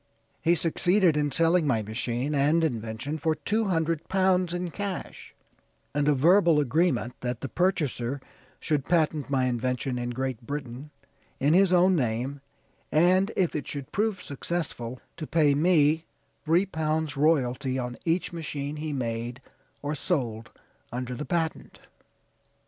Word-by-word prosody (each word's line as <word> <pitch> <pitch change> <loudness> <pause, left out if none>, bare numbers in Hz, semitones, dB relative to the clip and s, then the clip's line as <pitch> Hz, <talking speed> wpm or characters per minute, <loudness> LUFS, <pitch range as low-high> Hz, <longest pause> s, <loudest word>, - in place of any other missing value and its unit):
He 170 +1 +3
succeeded 175 +1 +2
in 145 -1 +1
selling 165 +2 +3
my 115 -5 +1
machine 120 +6 -2
and 150 +4 +3
invention 115 +2 -3
for 160 +2 +1
two 215 +9 0
hundred 165 -3 -1
pounds 185 -2 +2
in 175 0 -3
cash, 200 -1 -6 0.6
and 145 0 +1
a 150 - +4
verbal 170 +2 +5
agreement 140 -4 +1
that 125 -1 -3
the 135 - -3
purchaser 140 -7 0 0.4
should 145 -3 -1
patent 155 -4 +1
my 130 -2 +2
invention 125 +1 -1
in 120 0 -3
Great 130 -1 -3
Britain, 135 +1 -6 0.5
in 145 +3 +3
his 190 +1 +5
own 185 +1 +5
name; 130 +1 -1 0.5
and 185 +6 +4
if 180 -3 +1
it 150 - -3
should 140 -2 -6
prove 210 -2 -1
successful, 140 -5 -4 0.2
to 155 - -5
pay 150 -3 +3
me 155 0 +3 0.4
three 170 +5 +3
pounds 160 -4 -1
royalty 135 -3 +1
on 125 -1 -3
each 170 +1 0
machine 150 -3 -4
he 155 0 -4
made 120 -1 -3 0.4
or 145 +1 -1
sold 120 - -2 0.4
under 125 +1 -4
the 135 +5 -5
patent. 165 -3 -2
150 Hz, 145 wpm, -27 LUFS, 130-170 Hz, 0.6 s, verbal